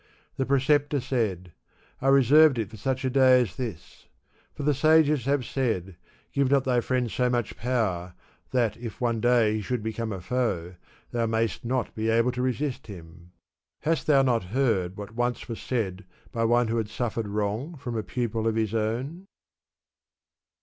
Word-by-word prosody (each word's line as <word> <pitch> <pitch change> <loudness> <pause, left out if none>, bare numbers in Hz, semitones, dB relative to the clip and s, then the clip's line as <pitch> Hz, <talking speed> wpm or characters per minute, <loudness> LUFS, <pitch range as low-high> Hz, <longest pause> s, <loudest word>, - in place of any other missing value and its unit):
The 135 - -1
pre 140 0 +3
ceptor 145 +1 +2
said, 110 -9 -2 0.5
I 135 - 0
reserved 140 +2 +6
it 110 -3 -3
for 110 - -10
such 130 +4 -2
a - - +2
day 130 -1 +6
as 115 -6 -3
this; 110 - -7 0.4
for 145 - -7
the 150 +1 +3
sages 150 -2 +4
have 140 -2 +1
said, 110 -9 -2 0.4
*Give 140 -2 +2
not 140 -1 +3
thy 125 -2 +2
friend 125 -2 -1
so 125 -1 +1
much 120 -3 -1
power 100 -8 -1 0.3
that 115 -5 0
if 115 0 -8
one 120 -3 0
day 120 -3 +3
he 110 - -1
should 120 +2 -3
become 110 0 -3
a 95 - -4
foe, 90 -5 -2 0.4
thou 115 -1 0
nuyst 115 0 -1
not 125 +1 -1
be 110 +1 -2
able 115 +2 +3
to 125 0 -3
resist 130 +1 -2
him.* 85 -2 -12 0.5
Hast 165 +1 0
thou 140 -3 +5
not 120 -6 +1
heard 100 -5 0
what 105 +1 -8
once 120 0 -2
was 115 -2 -6
said 100 -7 -2 0.3
by 115 -1 0
one 120 0 +3
who 115 - 0
had 110 -2 -2
suffered 115 -2 -3
wrong 105 +10 -2
from 125 -3 -5
a 110 - 0
pupil 115 -1 -2
of 110 - +1
his 110 -1 0
own? 125 - -2
120 Hz, 180 wpm, -26 LUFS, 110-130 Hz, 0.5 s, reserved